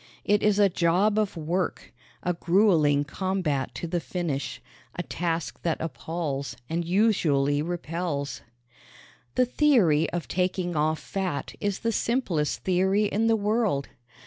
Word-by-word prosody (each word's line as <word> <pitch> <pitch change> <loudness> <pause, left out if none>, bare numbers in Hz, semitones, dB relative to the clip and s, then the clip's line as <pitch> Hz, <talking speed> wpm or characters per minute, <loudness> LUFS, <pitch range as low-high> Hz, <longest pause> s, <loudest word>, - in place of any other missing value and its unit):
It 205 0 +3
is 210 -1 +3
a 205 -1 +6
job 190 +4 +2
of 205 -4 -1
work, 170 +4 -2 0.3
a 180 - +1
grueling 170 -5 +3
combat 155 -3 -2
to - - -4
the 175 +1 -1
finish, 165 -5 -3 0.4
a 175 - -3
task 165 -1 -3
that 165 -2 -1
appalls 160 -3 -4
and 170 +2 -1
usually 165 -7 +2
repels. 165 -3 -3 0.9
The 255 - +4
theory 230 - +3
of 175 -1 -4
taking 180 -1 -1
off 155 +1 +1
fat 185 -7 -3
is 205 -2 -2
the 230 - +1
simplest 205 - 0
theory 190 +3 +2
in 215 +2 +1
the 225 - +4
world. 210 -9 0
175 Hz, 135 wpm, -26 LUFS, 155-200 Hz, 0.9 s, a